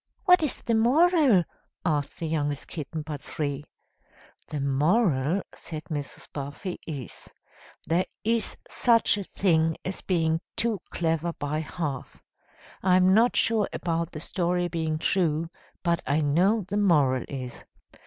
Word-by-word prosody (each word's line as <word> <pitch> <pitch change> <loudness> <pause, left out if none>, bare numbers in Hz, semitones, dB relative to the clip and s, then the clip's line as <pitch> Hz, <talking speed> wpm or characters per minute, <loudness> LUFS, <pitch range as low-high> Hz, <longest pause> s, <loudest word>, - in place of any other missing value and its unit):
"What 360 -3 +7
is 300 -5 -2
the 235 - 0
moral?" 265 - +5 0.4
asked 150 -4 -1
the 165 - -2
youngest 145 -2 -1
kitten 155 -1 -5
but 150 -2 -6
three. 145 -2 -3 0.8
"The 150 - -4
moral," 150 - +2
said 155 -2 -7
Mrs. 145 -2 -5
Buffy, 145 +6 -5
"is, 140 -6 -5 0.5
'There 170 +3 +1 0.2
is 230 +1 0
such 230 -3 +3
a - - -3
thing 160 -4 +1
as 185 - -4
being 165 -3 +1
too 225 -3 0
clever 165 0 -1
by 150 0 -2
half.' 150 -3 -5 0.6
I'm 185 0 +5
not 230 +4 +4
sure 220 -3 +2
about 170 -1 -2
the 155 - -6
story 175 +1 0
being 160 -2 -1
true, 165 -1 +1 0.3
but 170 -2 +1
I 145 +3 +2
know 180 +10 +3
the 200 +2 -2
moral 145 - +3
is. 130 -3 -6
165 Hz, 135 wpm, -27 LUFS, 150-195 Hz, 0.8 s, What